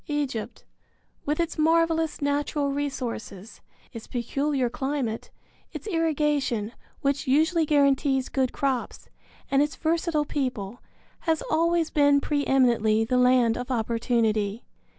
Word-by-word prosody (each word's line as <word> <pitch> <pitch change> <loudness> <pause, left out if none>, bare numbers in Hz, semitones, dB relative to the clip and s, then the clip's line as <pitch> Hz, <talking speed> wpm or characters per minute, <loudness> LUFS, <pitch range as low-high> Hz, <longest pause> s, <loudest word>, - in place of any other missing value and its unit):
Egypt, 285 -7 -3 0.6
with 295 +2 0
its 335 -2 -2
marvelous 325 -1 +2
natural 285 0 0
resources, 245 -7 -5 0.3
its 230 - -9
peculiar 270 +2 -1
climate, 265 -3 -3 0.4
its - - -7
irrigation, 300 - 0 0.3
which 280 0 -1
usually 315 +4 +3
guarantees 275 -2 +2
good 260 -2 0
crops, 265 -3 -3 0.4
and 275 0 +4
its 295 +1 0
versatile 325 -1 0
people, 245 -7 -3 0.5
has 320 -1 +1
always 335 +1 +2
been 285 -1 +4
pre 285 0 -1
eminently 225 -4 +3
the 250 +2 +1
land 250 -2 +4
of 245 +1 -5
opportunity. 225 -2 0
275 Hz, 115 wpm, -26 LUFS, 240-300 Hz, 0.6 s, and